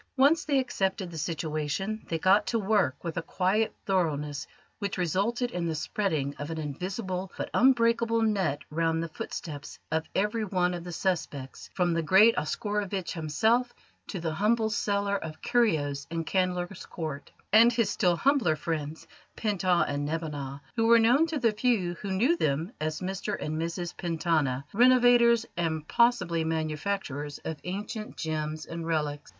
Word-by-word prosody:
Once 290 Hz, +4 st, +4 dB
they 285 Hz, -2 st, +2 dB
accepted 190 Hz, -8 st, -1 dB
the 165 Hz, -, -7 dB
situation, 155 Hz, +7 st, -2 dB
they 165 Hz, -, 0 dB
got 195 Hz, +5 st, +4 dB
to 230 Hz, -, +1 dB
work 200 Hz, -, +2 dB
with 170 Hz, 0 st, -4 dB
a -, -, +1 dB
quiet 195 Hz, +6 st, +1 dB
thoroughness 150 Hz, -7 st, -1 dB, 0.3 s
which 200 Hz, -2 st, -3 dB
resulted 205 Hz, -, 0 dB
in 175 Hz, -1 st, -2 dB
the 160 Hz, -, -1 dB
spreading 155 Hz, -, -1 dB
of 145 Hz, +2 st, -5 dB
an 165 Hz, -, -4 dB
invisible 185 Hz, -, -4 dB
but -, -, -4 dB
unbreakable 230 Hz, -2 st, +3 dB
net 195 Hz, -10 st, 0 dB
round 165 Hz, +1 st, 0 dB
the -, -, -3 dB
footsteps 150 Hz, -2 st, -7 dB
of 160 Hz, 0 st, -1 dB
every 210 Hz, +3 st, +1 dB
one 180 Hz, -3 st, +1 dB
of 175 Hz, -1 st, -5 dB
the 175 Hz, -, -7 dB
suspects 165 Hz, -7 st, -3 dB
from 175 Hz, -2 st, +2 dB
the 165 Hz, -, +1 dB
great 195 Hz, +8 st, +6 dB
Oscarovitch 200 Hz, +1 st, -2 dB
himself 220 Hz, +10 st, +1 dB, 0.3 s
to 190 Hz, -, -4 dB
the 165 Hz, -1 st, -2 dB
humble 220 Hz, +5 st, +1 dB
seller 200 Hz, -1 st, 0 dB
of 160 Hz, -4 st, -7 dB
curios 145 Hz, -12 st, +1 dB
in 165 Hz, 0 st, -2 dB
Candler's 180 Hz, +1 st, -1 dB
Court, 155 Hz, -4 st, -6 dB, 0.2 s
and 230 Hz, +2 st, +8 dB
his 230 Hz, -4 st, +1 dB
still 175 Hz, -1 st, +2 dB
humbler 250 Hz, -, +2 dB
friends 155 Hz, 0 st, -4 dB, 0.3 s
Pent 210 Hz, -4 st, -2 dB
Ah 180 Hz, -2 st, +4 dB
and 145 Hz, 0 st, -2 dB
Neb 160 Hz, +3 st, -2 dB
Anat, 140 Hz, -3 st, -5 dB
who 225 Hz, -1 st, +2 dB
were 235 Hz, 0 st, +7 dB
known 245 Hz, +8 st, +4 dB
to 320 Hz, -2 st, -2 dB
the 235 Hz, -5 st, +3 dB
few 210 Hz, -5 st, +1 dB
who 200 Hz, -, -4 dB
knew 240 Hz, -, +3 dB
them 155 Hz, -, 0 dB
as 155 Hz, +2 st, -2 dB
Mr 190 Hz, +2 st, -3 dB
and 155 Hz, +1 st, -3 dB
Mrs 170 Hz, +1 st, -4 dB
Pentana, 160 Hz, -6 st, 0 dB
renovators, 240 Hz, 0 st, +5 dB
and, 160 Hz, -3 st, -2 dB
possibly 185 Hz, -9 st, +2 dB
manufacturers, 155 Hz, -2 st, -2 dB
of 160 Hz, -, -3 dB
ancient 210 Hz, +4 st, -5 dB
gems 155 Hz, -1 st, -3 dB
and 165 Hz, 0 st, -6 dB
relics. 150 Hz, -3 st, -2 dB
180 Hz, 165 wpm, -28 LUFS, 155-215 Hz, 0.3 s, and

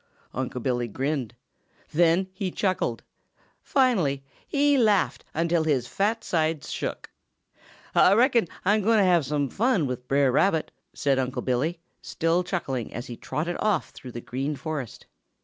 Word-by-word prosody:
Unc' 125 Hz, -1 st, -4 dB
Billy 120 Hz, -2 st, 0 dB
grinned. 130 Hz, 0 st, -2 dB, 0.6 s
Then 170 Hz, +3 st, +3 dB
he 190 Hz, -1 st, -3 dB
chuckled. 180 Hz, -, -1 dB, 0.6 s
Finally 185 Hz, -, +2 dB, 0.2 s
he 290 Hz, 0 st, +3 dB
laughed 215 Hz, -7 st, +2 dB
until 165 Hz, 0 st, +2 dB
his 140 Hz, -6 st, +1 dB
fat 220 Hz, -, -1 dB
sides 160 Hz, -3 st, -1 dB
shook. -, -, -4 dB, 0.8 s
"Ah 185 Hz, -, +6 dB
reckon 235 Hz, -2 st, +4 dB, 0.2 s
Ah'm 210 Hz, +3 st, +3 dB
gwine 225 Hz, +3 st, +3 dB
to 205 Hz, -, +5 dB
have 175 Hz, -6 st, +3 dB
some 145 Hz, -1 st, 0 dB
fun 220 Hz, -, +1 dB
with 125 Hz, -1 st, -5 dB
Brer 140 Hz, -1 st, +3 dB
Rabbit," 160 Hz, +4 st, +2 dB, 0.2 s
said 135 Hz, -2 st, +1 dB
Unc' 130 Hz, 0 st, -2 dB
Billy, 140 Hz, +7 st, 0 dB, 0.2 s
still 165 Hz, +2 st, 0 dB
chuckling, 140 Hz, -, -3 dB
as 120 Hz, +2 st, -6 dB
he 120 Hz, -, -7 dB
trotted 155 Hz, +9 st, -3 dB
off 210 Hz, -6 st, 0 dB
through 125 Hz, -2 st, -11 dB
the 120 Hz, -, -6 dB
Green 135 Hz, +5 st, -3 dB
Forest. 145 Hz, -5 st, -5 dB
160 Hz, 150 wpm, -26 LUFS, 130-195 Hz, 0.8 s, Ah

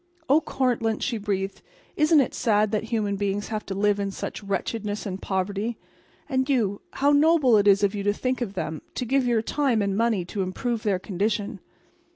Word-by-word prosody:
"Oh, 290 Hz, +4 st, +5 dB
Cortlandt," 240 Hz, -6 st, 0 dB
she 235 Hz, -5 st, -1 dB
breathed, 195 Hz, -1 st, -3 dB, 0.3 s
"isn't 305 Hz, 0 st, +5 dB
it 255 Hz, -, -2 dB
sad 215 Hz, -2 st, +2 dB
that 215 Hz, 0 st, -1 dB
human 215 Hz, -3 st, -1 dB
beings 200 Hz, 0 st, -2 dB
have 215 Hz, -1 st, -3 dB
to 195 Hz, -, -3 dB
live 205 Hz, +1 st, +2 dB
in 200 Hz, 0 st, -1 dB
such 195 Hz, -, -5 dB
wretchedness 205 Hz, +2 st, -3 dB
and 195 Hz, -1 st, -5 dB
poverty? 200 Hz, +4 st, -2 dB, 0.5 s
And 260 Hz, -2 st, 0 dB
you—how 245 Hz, +3 st, +1 dB
noble 290 Hz, -4 st, +5 dB
it 205 Hz, -1 st, +4 dB
is 200 Hz, 0 st, +5 dB
of 200 Hz, 0 st, +2 dB
you 205 Hz, -, -3 dB
to 205 Hz, +1 st, +1 dB
think 255 Hz, +3 st, -2 dB
of 205 Hz, -4 st, -3 dB
them, 160 Hz, -4 st, -3 dB
to 250 Hz, -, -2 dB
give 260 Hz, +1 st, +1 dB
your 230 Hz, -2 st, +2 dB
time 270 Hz, -3 st, +1 dB
and 200 Hz, -1 st, 0 dB
money 220 Hz, -4 st, +1 dB
to 195 Hz, +3 st, -4 dB
improve 225 Hz, +5 st, -2 dB
their 205 Hz, -4 st, +1 dB
condition!" 200 Hz, +2 st, -2 dB
210 Hz, 195 wpm, -25 LUFS, 200-245 Hz, 0.5 s, Oh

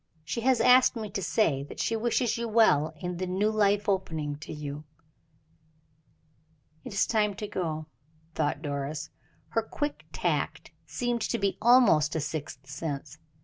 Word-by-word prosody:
She 160 Hz, +9 st, -3 dB
has 255 Hz, 0 st, +3 dB
asked 250 Hz, 0 st, +6 dB
me 215 Hz, -3 st, -5 dB
to 195 Hz, -, -3 dB
say 165 Hz, -11 st, +1 dB
that 140 Hz, -, -9 dB
she 225 Hz, -, 0 dB
wishes 235 Hz, +1 st, +1 dB
you 235 Hz, 0 st, -2 dB
well 210 Hz, -9 st, +4 dB
in 180 Hz, 0 st, -4 dB
the 185 Hz, +1 st, -3 dB
new 195 Hz, +4 st, +1 dB
life 205 Hz, -1 st, +2 dB
opening 160 Hz, -7 st, -1 dB
to 150 Hz, -, -9 dB
you." 150 Hz, 0 st, -6 dB, 2.0 s
"It -, -, -7 dB
is 200 Hz, +1 st, +2 dB
time 210 Hz, -3 st, +1 dB
to 210 Hz, +1 st, -5 dB
go," 160 Hz, -6 st, -3 dB, 0.5 s
thought 150 Hz, -1 st, -1 dB
Doris. 145 Hz, +1 st, -4 dB, 0.4 s
Her 225 Hz, -, +1 dB
quick 290 Hz, +6 st, -4 dB
tact -, -, -2 dB, 0.2 s
seemed 240 Hz, -1 st, -2 dB
to -, -, 0 dB
be 200 Hz, -1 st, 0 dB
almost 215 Hz, -11 st, +5 dB
a -, -, +1 dB
sixth 145 Hz, -3 st, -5 dB
sense. 145 Hz, 0 st, -5 dB
185 Hz, 155 wpm, -28 LUFS, 150-220 Hz, 2.0 s, asked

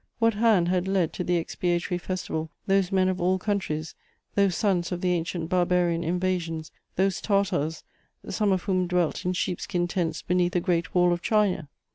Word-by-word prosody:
What 230 Hz, -1 st, +3 dB
hand 210 Hz, -5 st, +3 dB
had 180 Hz, 0 st, +1 dB
led 190 Hz, -4 st, +1 dB
to -, -, -3 dB
the 175 Hz, 0 st, +1 dB
expiatory 175 Hz, +1 st, -1 dB
festival 170 Hz, -3 st, -3 dB, 0.2 s
those 195 Hz, -1 st, +2 dB
men 190 Hz, -1 st, +3 dB
of 185 Hz, -1 st, -1 dB
all 185 Hz, +2 st, +2 dB
countries, 185 Hz, -6 st, -2 dB, 0.4 s
those 200 Hz, -3 st, +2 dB
sons 190 Hz, -5 st, +1 dB
of 175 Hz, -1 st, -3 dB
the 180 Hz, -, +1 dB
ancient 170 Hz, -1 st, -2 dB
barbarian 175 Hz, -1 st, +2 dB
invasions, 170 Hz, -2 st, -2 dB, 0.2 s
those 190 Hz, +1 st, +1 dB
Tartars, 185 Hz, -6 st, 0 dB, 0.4 s
some 210 Hz, -2 st, +1 dB
of 185 Hz, -2 st, +1 dB
whom 185 Hz, -2 st, +1 dB
dwelt 180 Hz, -2 st, 0 dB
in 180 Hz, -, +1 dB
sheep 180 Hz, -1 st, -2 dB
skin 175 Hz, -3 st, -1 dB
tents 170 Hz, -3 st, -2 dB
beneath 180 Hz, -1 st, +1 dB
the 180 Hz, -, +2 dB
Great 170 Hz, -1 st, -1 dB
Wall 175 Hz, -1 st, +4 dB
of 175 Hz, -, -3 dB
China? 200 Hz, -9 st, +1 dB
180 Hz, 180 wpm, -26 LUFS, 175-190 Hz, 0.4 s, Wall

